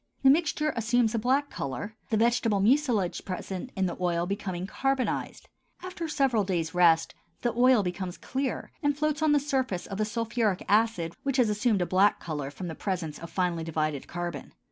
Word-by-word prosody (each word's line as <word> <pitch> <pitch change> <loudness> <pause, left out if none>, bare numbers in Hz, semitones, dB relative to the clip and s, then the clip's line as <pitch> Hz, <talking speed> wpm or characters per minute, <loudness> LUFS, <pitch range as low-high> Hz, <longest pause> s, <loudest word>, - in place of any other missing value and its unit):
The 270 - +8
mixture 305 -1 +1
assumes 230 0 +2
a 230 - +1
black 270 +5 +1
color, 140 - -5
the 220 - +1
vegetable 230 -2 +2
mucilage 230 -4 +2
present 185 +4 -5
in 190 -2 +1
the 175 - -2
oil 170 -1 +1
becoming 190 -2 -3
carbonized. 270 +5 -2 0.4
After 365 -3 -5
several 270 -8 +2
days' 170 -4 -2
rest 170 -2 +4 0.3
the 240 - +1
oil 245 -2 +5
becomes 180 0 -4
clear 265 0 -3
and 290 -2 +1
floats 305 0 0
on 310 -1 +3
the 295 - +5
surface 260 -10 -1
of 195 0 -6
the 215 - +2
sulphuric 225 -2 -1
acid 205 -6 +2
which 275 -1 -1
has 245 -4 +4
assumed 210 -2 +1
a - - -1
black 190 +3 +3
color 150 -4 -4
from 180 +5 -7
the 165 - -4
presence 165 -5 -3
of 170 - -8
finely 175 -1 -1
divided 155 -3 -2
carbon. 175 0 -5
210 Hz, 185 wpm, -28 LUFS, 175-255 Hz, 0.4 s, The